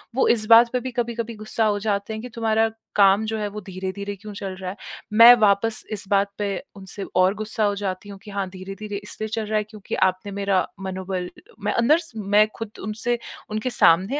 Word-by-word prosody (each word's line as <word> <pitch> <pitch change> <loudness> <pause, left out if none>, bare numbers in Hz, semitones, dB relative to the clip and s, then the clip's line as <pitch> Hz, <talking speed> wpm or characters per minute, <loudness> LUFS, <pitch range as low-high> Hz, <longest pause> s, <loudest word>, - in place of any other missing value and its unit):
वो 265 - +3
इस 220 -2 +2
बात 230 +1 +8
पे 250 - +2
भी 255 +1 -5
कभी-कभी 235 -1 -3
गुस्सा 215 +1 -1
हो 205 -1 +1
जाते 200 0 -2
हैं 220 - -5
कि 250 - -8
तुम्हारा 225 -1 +2 0.3
काम 200 +1 +5
जो 220 0 -2
है 210 - -2
वो 210 +1 -6
धीरे-धीरे 190 +2 -5
क्यों 210 +2 -10
चल 195 -2 -5
रहा 185 -1 -6
है, 190 - -6 0.4
मैं 230 +3 +10
वापस 215 +1 +2
इस 205 -2 -4
बात 200 0 +2
पे 205 - -1 0.3
उनसे 195 0 -8
और 185 +1 +4
गुस्सा 215 +1 -2
हो 205 -1 +2
जाती 195 0 -4
हूँ 200 - -8
कि 205 - -10
हाँ, 200 -1 -2
धीरे-धीरे 195 +2 -7
इसलिए 215 +1 -6
चल 220 0 -3
रहा 215 +1 0
है 210 - +1
क्योंकि 215 -1 -7
आपने 185 +2 0
मेरा 195 -2 +1
मनोबल 190 -1 -4 0.4
मैं 210 - +1
अंदर 235 +7 +4
स 330 - -10
मैं 210 0 +3
खुद 225 -2 -6
उनसे 220 +4 0 0.3
उनके 215 +4 -1
सामने 195 - +4
210 Hz, 215 wpm, -23 LUFS, 195-220 Hz, 0.4 s, मैं